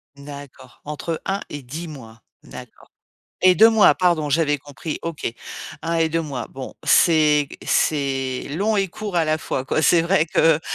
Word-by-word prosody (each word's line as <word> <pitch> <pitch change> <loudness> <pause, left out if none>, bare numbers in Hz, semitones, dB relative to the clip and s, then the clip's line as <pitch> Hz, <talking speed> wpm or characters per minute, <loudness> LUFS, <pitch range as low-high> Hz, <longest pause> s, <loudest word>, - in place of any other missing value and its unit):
D'accord. 140 -3 -12
Entre 150 +2 -5
1 195 +1 -2
et 145 - -7
10 155 +8 -7
mois? 115 -7 -12 0.2
D'accord - - -13 0.6
et 185 -1 +7
2 220 +4 +7
mois, 220 -2 +5
pardon, 170 -5 +1
j'avais 150 0 +1
compris. 145 +2 -7
OK. 165 -2 -6 0.6
1 165 +1 -2
et 165 -1 +2
2 165 +1 -1
mois, 135 -7 -5
bon, 130 -1 -9
c'est 150 -3 +4 0.2
c'est 135 -3 0
long 210 +4 0
et 195 -1 +1
court 200 0 -5
à 165 - +2
la 155 0 +1
fois 135 -4 -4
quoi, 145 - 0
c'est 165 +2 +4
vrai 170 -1 +2
que, 160 -1 +3
155 Hz, 175 wpm, -21 LUFS, 140-170 Hz, 0.6 s, et